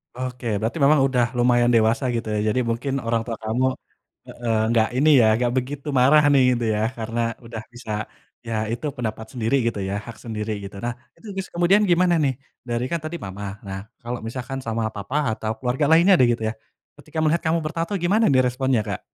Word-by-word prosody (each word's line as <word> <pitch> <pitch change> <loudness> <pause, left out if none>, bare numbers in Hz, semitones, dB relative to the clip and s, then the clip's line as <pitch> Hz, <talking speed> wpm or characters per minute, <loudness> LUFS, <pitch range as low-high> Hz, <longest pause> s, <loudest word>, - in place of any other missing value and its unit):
Oke 125 -1 -5
berarti 110 +8 -2
memang 150 +1 +6
udah 125 -2 +2
lumayan 120 0 +4
dewasa 115 +4 +3
gitu 115 - -3
ya, 105 - 0
jadi 125 +4 +1
mungkin 125 +4 -2
orang 115 0 +1
tua 115 - -2
kamu 115 +4 0 0.6
heeh, 115 -2 -2
enggak 115 -1 +3
ini 150 +4 +4
ya 110 - +5
enggak 120 +1 0
begitu 140 +3 -3
marah 150 +4 +6
nih 135 -2 +5
gitu 120 -1 -2
ya 105 - -1 0.2
karena 115 +1 -4 0.3
udah 115 -1 -6
bisa, 120 -2 -8 0.6
ya 115 - -3 0.2
itu 120 +6 -4
pendapat 110 -2 -4
sendiri 115 +1 0
gitu 115 - -2
ya, - - -2
hak 115 - -9
sendiri 110 -1 -4
gitu. 100 0 -8
Nah 120 - -1 0.2
itu 225 - -14
terus 190 -1 -4
kemudian 175 +4 +4
gimana 175 0 +4
nih, 135 -2 +2 0.4
dari 120 +1 -1
kan 170 - 0
tadi 155 +2 -4
mama, 95 +2 -7 0.2
nah 95 0 -4 0.2
kalo 120 +1 -4
misalkan 130 +3 -5
sama 115 0 -1
papa 105 +8 -3 0.2
atau 110 0 -3
keluarga 125 +4 0
lainnya 170 +4 +6
deh 125 - +6
gitu 115 - -5
ya, - - -4 0.4
ketika - - -11
melihat 160 +2 +2
kamu 160 +1 +2
bertato 165 +3 -3
gimana 210 +6 +3
nih 130 -1 +5
responnya 130 -1 +1
Kak? - - -3
125 Hz, 200 wpm, -23 LUFS, 115-145 Hz, 0.6 s, memang